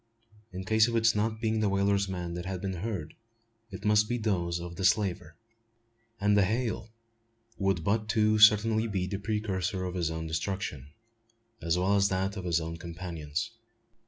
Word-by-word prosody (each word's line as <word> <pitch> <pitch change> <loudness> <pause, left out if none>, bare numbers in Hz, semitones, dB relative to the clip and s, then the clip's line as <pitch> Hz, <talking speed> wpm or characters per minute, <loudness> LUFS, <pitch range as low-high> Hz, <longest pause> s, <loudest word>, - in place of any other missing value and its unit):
In 95 0 -6
case 110 +1 +4
of 120 - -2
its 115 -1 +4
not 110 +1 -1
being 110 -1 0
the 105 -2 +2
whaler's 100 0 +1
men 90 -2 -4
that 85 +1 -5
had 95 -1 -3
been 95 -1 -3
heard 95 -8 -4 0.6
it 95 0 -9
must 105 0 +4
be 120 - 0
those 90 -6 -1
of 85 0 -7
the 95 - -5
slaver; 90 -4 +1 0.8
and 105 0 +3
the 100 - +5
hail 110 +1 -1 0.7
would 95 -4 +1
but 110 +4 0
too 110 -1 +3
certainly 110 +1 +6
be 95 -4 -1
the 95 +1 -4
precursor 100 -3 -2
to - - -9
his 85 -3 0
own 80 0 -4
destruction, 80 -3 -3 0.7
as 85 +1 +1
well 95 +3 +2
as 100 0 +3
that 95 +1 -1
of 95 -2 -6
his 85 -2 +2 0.2
companions. 85 +1 -5
100 Hz, 175 wpm, -29 LUFS, 90-110 Hz, 0.8 s, certainly